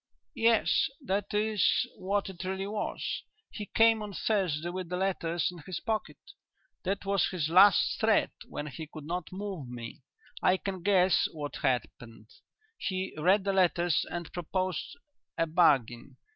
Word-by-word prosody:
"Yes, 230 +2 +3 0.2
that 200 -1 -1
is 210 0 +2
what 200 +2 -1
it 190 -2 -7
really 190 +1 -3
was. 210 +1 -3 0.3
He 210 -2 -6
came 225 -1 +4
on 210 -1 -6
Thursday 175 -6 0
with 180 -1 -5
the 180 - -2
letters 175 -3 0
in 175 - -11
his 170 +2 -6
pocket. 220 +3 -3 0.7
That 195 +2 -2
was 195 -1 +2
his 165 -5 -2
last 190 +3 +6
threat - - +3 0.2
when 145 - -5
he 150 +2 -7
could 155 0 -10
not 175 +1 -4
move 190 -8 -5
me. 120 0 -8 0.4
I 185 - +4
can 190 -1 -5
guess 185 -1 +4
what 145 -2 -6
happened. 115 -3 -3 0.5
He 190 -1 -3
read 185 +6 +3
the 195 0 0
letters 175 -3 +2
and 175 -1 -6
proposed 185 - -3 0.4
a 165 - +2
bargain. 135 -6 +2
185 Hz, 150 wpm, -30 LUFS, 160-200 Hz, 0.7 s, last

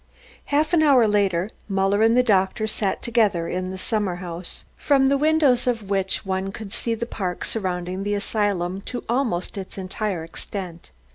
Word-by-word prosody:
Half 300 +3 +1
an 335 - +5
hour 270 -7 +6
later 200 -2 +1 0.2
Muller 195 +1 +2
and 225 +2 +5
the 250 - +6
doctor 200 -1 +2
sat 210 -2 -1
together 210 -8 +2
in 185 0 -3
a 190 - -5
summer 200 -2 -1
house, 175 -1 -6
from 270 -2 +3
the 280 - +3
windows 290 -5 +3
of 225 -5 -1
which 195 0 0
one 190 0 -2
could 205 -1 -8
see 230 -1 -1
the 235 - -3
park 185 -6 -3
surrounding 185 -3 -3
the 205 +1 -1
asylum 200 -3 -1
to 245 - -4
almost 230 -7 -1
its 190 +1 -8
entire 190 -1 -3
extent. 175 +1 -7
200 Hz, 170 wpm, -23 LUFS, 185-235 Hz, 0.2 s, hour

